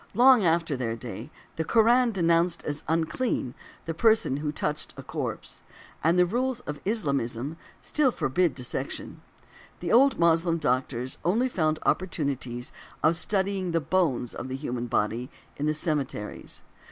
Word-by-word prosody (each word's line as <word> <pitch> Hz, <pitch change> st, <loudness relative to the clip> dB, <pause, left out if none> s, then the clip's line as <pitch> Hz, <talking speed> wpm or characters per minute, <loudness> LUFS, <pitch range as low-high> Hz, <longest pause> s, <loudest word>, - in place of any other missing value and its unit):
Long 250 Hz, -1 st, +7 dB
after 165 Hz, -3 st, +2 dB
their 120 Hz, -3 st, -2 dB
day, 115 Hz, +2 st, -7 dB, 0.3 s
the 160 Hz, -, 0 dB
Koran 235 Hz, +6 st, +4 dB
denounced 170 Hz, -2 st, +2 dB
as 145 Hz, 0 st, -4 dB
unclean 160 Hz, -, 0 dB, 0.3 s
the 165 Hz, -, -2 dB
person 220 Hz, -, +3 dB
who 150 Hz, 0 st, -2 dB
touched 150 Hz, 0 st, -3 dB
a -, -, -7 dB
corpse, -, -, -5 dB, 0.4 s
and 165 Hz, +3 st, +4 dB
|150| -, -, +1 dB
the 180 Hz, -, +6 dB
rules 245 Hz, +6 st, -1 dB
of 150 Hz, -8 st, -6 dB
Islamism 140 Hz, -, -1 dB, 0.3 s
still 300 Hz, -3 st, +2 dB
forbid 165 Hz, -, +1 dB
dissection; 125 Hz, -2 st, -4 dB, 0.6 s
the 170 Hz, -, -3 dB
old 270 Hz, +4 st, +5 dB
Moslem 165 Hz, 0 st, +3 dB
doctors 130 Hz, -3 st, -1 dB
only 225 Hz, +9 st, +2 dB
found 155 Hz, -9 st, 0 dB
opportunities 135 Hz, -9 st, -1 dB, 0.3 s
of 160 Hz, +2 st, +4 dB
studying 190 Hz, 0 st, -1 dB
the 165 Hz, -, +3 dB
bones 145 Hz, -7 st, 0 dB
of 130 Hz, -, -6 dB
the 130 Hz, -, -4 dB
human 125 Hz, -3 st, -3 dB
body 115 Hz, +3 st, -1 dB, 0.3 s
in 145 Hz, -, -1 dB
the 155 Hz, -, +2 dB
cemeteries. 145 Hz, -, -3 dB
160 Hz, 150 wpm, -27 LUFS, 130-185 Hz, 0.6 s, Long